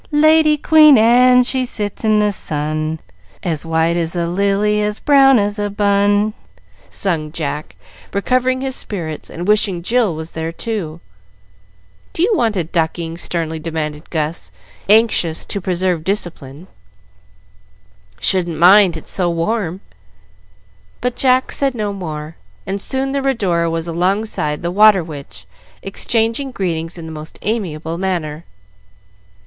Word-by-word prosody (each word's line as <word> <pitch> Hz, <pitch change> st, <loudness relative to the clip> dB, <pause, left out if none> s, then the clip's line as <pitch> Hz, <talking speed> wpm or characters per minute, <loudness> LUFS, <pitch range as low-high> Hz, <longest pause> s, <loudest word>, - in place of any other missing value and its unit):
"Lady 310 Hz, 0 st, +4 dB
Queen 305 Hz, -2 st, +6 dB
Anne, 250 Hz, +3 st, +5 dB
she 260 Hz, +1 st, 0 dB
sits 210 Hz, -4 st, -4 dB
in 215 Hz, -1 st, +3 dB
the 210 Hz, 0 st, +2 dB
sun, 155 Hz, -2 st, -3 dB, 0.4 s
As 165 Hz, -2 st, -3 dB
white 165 Hz, +1 st, +1 dB
as 170 Hz, 0 st, -2 dB
a 170 Hz, -1 st, 0 dB
lily, 200 Hz, +3 st, +1 dB
as 210 Hz, 0 st, -2 dB
brown 270 Hz, -2 st, +5 dB
as 205 Hz, 0 st, -1 dB
a 205 Hz, 0 st, -1 dB
bun," 205 Hz, +1 st, +1 dB, 0.6 s
sung 160 Hz, -6 st, -1 dB
Jack, 150 Hz, -1 st, -5 dB, 0.4 s
recovering 255 Hz, +5 st, 0 dB
his 265 Hz, -1 st, -1 dB
spirits, 160 Hz, -7 st, -4 dB
and 175 Hz, +3 st, -6 dB
wishing 205 Hz, -4 st, +1 dB
Jill 225 Hz, -4 st, +1 dB
was 160 Hz, +1 st, -7 dB
there 160 Hz, 0 st, -4 dB
too. 170 Hz, -4 st, -4 dB, 1.1 s
"Do 330 Hz, -, 0 dB
you 425 Hz, -, +2 dB
want 230 Hz, -, +1 dB
a 180 Hz, -, 0 dB
ducking?" 165 Hz, 0 st, -2 dB
sternly 165 Hz, -2 st, -3 dB
demanded 155 Hz, -1 st, -5 dB
Gus, 160 Hz, 0 st, -3 dB, 0.4 s
anxious 210 Hz, -7 st, +3 dB
to 200 Hz, -, -3 dB
preserve 180 Hz, -2 st, -1 dB
discipline. 170 Hz, -5 st, -3 dB, 1.5 s
"Shouldn't 175 Hz, -4 st, +1 dB
mind, 180 Hz, +1 st, +6 dB
its 160 Hz, -, -10 dB
so 180 Hz, -2 st, 0 dB
warm." 175 Hz, +2 st, -2 dB, 1.2 s
But 250 Hz, +1 st, -2 dB
Jack 255 Hz, -1 st, +2 dB
said 275 Hz, -2 st, 0 dB
no 210 Hz, -3 st, -2 dB
more, 155 Hz, -4 st, -7 dB, 0.3 s
and 195 Hz, +1 st, -3 dB
soon 265 Hz, +3 st, -2 dB
the 275 Hz, 0 st, -1 dB
"Rhodora" 195 Hz, -11 st, 0 dB
was 165 Hz, 0 st, -3 dB
alongside 175 Hz, -3 st, -1 dB
the 170 Hz, -, -1 dB
"Water 205 Hz, -1 st, +5 dB
Witch," 140 Hz, -, -10 dB, 0.4 s
exchanging 225 Hz, +6 st, -1 dB
greetings 170 Hz, -7 st, -3 dB
in 165 Hz, -, -8 dB
the 160 Hz, -, -8 dB
most 155 Hz, 0 st, -9 dB
amiable 170 Hz, -7 st, -3 dB
manner. 170 Hz, -4 st, -3 dB
190 Hz, 135 wpm, -17 LUFS, 165-220 Hz, 1.5 s, Queen